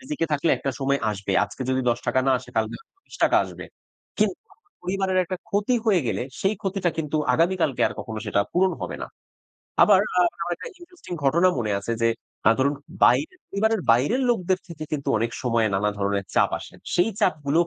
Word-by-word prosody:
রিজিকে 265 - -2
থাকলে 150 +3 +2
একটা 135 - -2
সময় 140 +1 +1
আসবে। 100 -1 -3
আজকে 130 - -7
যদি 130 0 +1
৳১০ 120 +2 0
না 135 - +4
আসে 125 - -13
কালকে 110 +1 0 0.3
৳২০ - - +2
আসবে। - - -9 0.5
কিন্তু - - +1 0.4
পরিবারের 190 +1 0
একটা 185 +2 -4
ক্ষতি 205 +5 +1
হয়ে 195 -5 +4
গেলে, 100 +2 -1 0.2
সেই 195 +2 +2
ক্ষতিটা 190 -3 0
কিন্তু 155 -1 -1 0.2
আগামী 175 +3 +2
কালকে 135 - +1
আর - - -8
কখনো 110 -1 -6
সেটা 100 - +2
পূরণ 185 +1 +3
হবে - - -4
না। - - -4 0.8
আবার 200 -3 +6 0.2
আ - - +6 0.2
আমার 175 +1 -2
একটা - - -8
ইন্টারেস্টিং 345 - -12
ঘটনা 170 +7 +4
মনে 110 -3 -1
আছে 110 +4 -3
যে 115 - +4 0.4
আ - - +7
ধরুন 140 +2 +2 0.3
বাইরের 370 +4 +2
পরিবারের 220 +1 +1
বাইরের 145 - +3
লোকদের 185 -4 +1
থেকে 155 -2 -7
কিন্তু 140 -2 -2
অনেক 115 +2 0
সময়ে 115 -3 +2
নানা 105 +2 +1
ধরনের 100 0 0
চাপ - - +4
আসে। - - -12 0.2
সেই 175 +5 +3
চাপগুলোও 160 -3 +2
160 Hz, 185 wpm, -24 LUFS, 120-190 Hz, 0.8 s, আ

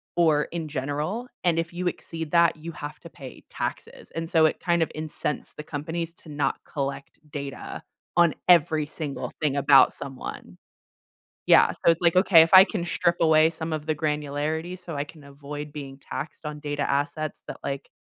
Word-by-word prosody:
or 155 -4 +4
in 165 -2 -5
general, 150 - -3 0.2
and 170 -2 +2
if 165 - -3
you 180 +1 -2
exceed 165 -3 -5
that, 170 -1 +4
you 165 +2 -7
have 150 +1 -7
to 170 - -12
pay 135 -5 -11
taxes, - - -5
and 165 0 -3
so 160 -2 +5
it - - +1
kind 170 -1 +2
of - - -4
incensed 155 -1 -4
the 150 - -6
companies 160 +3 -4
to 160 - -16
not 145 -1 -1
collect 140 -1 -4
data 140 -2 -6 0.4
on 170 -2 +5 0.2
every 155 -3 +5
single 150 -2 -5
thing 145 -2 +1
about 140 -1 +6
someone. 135 -2 -8 0.9
Yeah, - - +6
so 170 - +3
it's 165 - -2
like, 170 0 +3
"Okay, 185 -3 +7
if 165 - +4
I 185 0 +12
can 200 -6 -3
strip 170 0 +1
away 160 0 +5
some 160 0 -5
of 155 -1 -4
the 155 - +1
granularity, 150 +3 -2
so 175 -3 -8
I 140 - -1
can 150 0 -14
avoid 145 +1 -8
being 140 -2 -8
taxed 155 - -7
on 150 0 -5
data 145 -1 -4
assets 145 +2 -2
that - - -6
like, 140 0 -4
155 Hz, 185 wpm, -25 LUFS, 145-165 Hz, 0.9 s, I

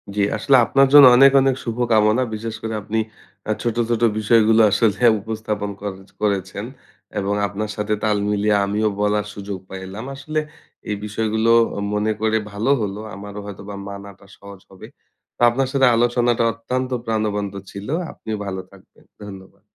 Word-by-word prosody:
জি। 105 - +1 0.2
আসলে 140 - +3
আপনার 135 +2 +4
জন্য 145 -1 +10
অনেক, 135 +2 +7
অনেক 135 -1 +2
শুভকামনা। 115 0 +2
বিশেষ 115 +1 -5
করে 110 0 -4
আপনি 110 +3 -3 0.5
আ - - +2
ছোট, 120 -2 -1
ছোট 120 -1 0 0.2
বিষয়গুলো 110 +1 +4
আসলে 105 +2 +2 0.2
উপস্থাপন 105 -2 -4
করে 100 -2 -5 0.2
করেছেন। 100 0 -2 0.5
এবং 100 +1 -1
আপনার 105 +2 -5
সাথে 105 0 -2
তাল 105 -1 +2
মিলিয়ে 105 0 +1
আমিও 105 +2 0
বলার 105 0 +1
সুযোগ 100 -1 -6
পাইলাম। 95 +4 -7
আসলে 155 +3 -3 0.5
এই 105 - 0
বিষয়গুলো 110 +2 -1 0.4
মনে 105 +1 0
করে 110 0 +2
ভালো 105 +5 -2
হলো। 100 0 -3 0.2
আমারও 100 +1 -8
হয়তোবা 100 0 -8
মানাটা 100 -1 -10
সহজ 100 -1 -12
হবে। 95 - -12 0.5
তো, - - -12
আপনার 130 +3 -1
সাথে 135 -1 +4
আলোচনাটা 120 0 +2
অত্যন্ত 125 +3 -3 0.2
প্রাণবন্ত 105 -3 -2 0.2
ছিলো। 100 +8 -6 0.2
আপনিও 110 -1 -6
ভালো 95 -1 -4
থাকবেন। 100 -1 -21 0.2
ধন্যবাদ। 95 -2 -12
105 Hz, 150 wpm, -21 LUFS, 100-115 Hz, 0.5 s, জন্য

